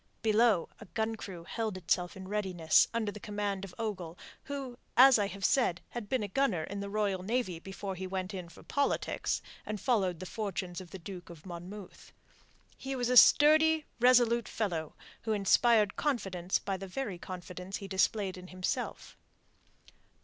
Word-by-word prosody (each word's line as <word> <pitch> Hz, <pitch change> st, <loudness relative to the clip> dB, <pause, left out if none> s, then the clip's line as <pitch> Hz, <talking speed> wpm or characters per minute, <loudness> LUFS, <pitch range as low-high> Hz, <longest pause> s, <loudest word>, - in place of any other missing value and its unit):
Below, 220 Hz, -4 st, +4 dB
a 220 Hz, -, -10 dB
gun 220 Hz, +3 st, -2 dB
crew 185 Hz, -5 st, -8 dB
held 220 Hz, +1 st, -3 dB
itself 180 Hz, 0 st, -1 dB
in 190 Hz, 0 st, -8 dB
readiness 185 Hz, -6 st, +3 dB
under 225 Hz, -3 st, -1 dB
the 210 Hz, -, -9 dB
command 205 Hz, -2 st, -3 dB
of 190 Hz, -2 st, -8 dB
Ogle, 185 Hz, -7 st, -4 dB, 0.3 s
who 270 Hz, -3 st, -6 dB, 0.2 s
as 260 Hz, -1 st, +8 dB
I 205 Hz, -, +1 dB
have 195 Hz, 0 st, -4 dB
said 240 Hz, -11 st, +2 dB
had 235 Hz, -4 st, -6 dB
been 255 Hz, -4 st, +1 dB
a -, -, -2 dB
gunner 205 Hz, -8 st, +1 dB
in 200 Hz, +5 st, -5 dB
the 200 Hz, 0 st, -4 dB
Royal 200 Hz, -2 st, 0 dB
Navy 195 Hz, -4 st, -1 dB
before 195 Hz, +2 st, -6 dB
he 185 Hz, 0 st, -5 dB
went 185 Hz, +1 st, -3 dB
in 180 Hz, -3 st, -6 dB
for -, -, -15 dB
politics 285 Hz, 0 st, -1 dB, 0.2 s
and 215 Hz, -1 st, -4 dB
followed 190 Hz, -9 st, +1 dB
the 185 Hz, -, -6 dB
fortunes 185 Hz, -3 st, -4 dB
of 180 Hz, -, -11 dB
the 190 Hz, -, -8 dB
Duke 180 Hz, -1 st, -9 dB
of 165 Hz, -1 st, -12 dB
Monmouth. 185 Hz, +3 st, -9 dB, 0.6 s
He 270 Hz, 0 st, -5 dB
was 245 Hz, -2 st, -1 dB
a 250 Hz, -, +2 dB
sturdy, 310 Hz, +4 st, +7 dB
resolute 240 Hz, -1 st, +5 dB
fellow 170 Hz, -8 st, -3 dB, 0.3 s
who 220 Hz, -, -1 dB
inspired 210 Hz, +1 st, +4 dB
confidence 190 Hz, -, 0 dB
by 195 Hz, -1 st, -3 dB
the 195 Hz, +1 st, -7 dB
very 195 Hz, -3 st, -4 dB
confidence 180 Hz, +1 st, -6 dB
he 195 Hz, -, -8 dB
displayed 190 Hz, 0 st, 0 dB
in 180 Hz, -, -11 dB
himself. 185 Hz, 0 st, -4 dB
200 Hz, 170 wpm, -31 LUFS, 185-230 Hz, 0.6 s, as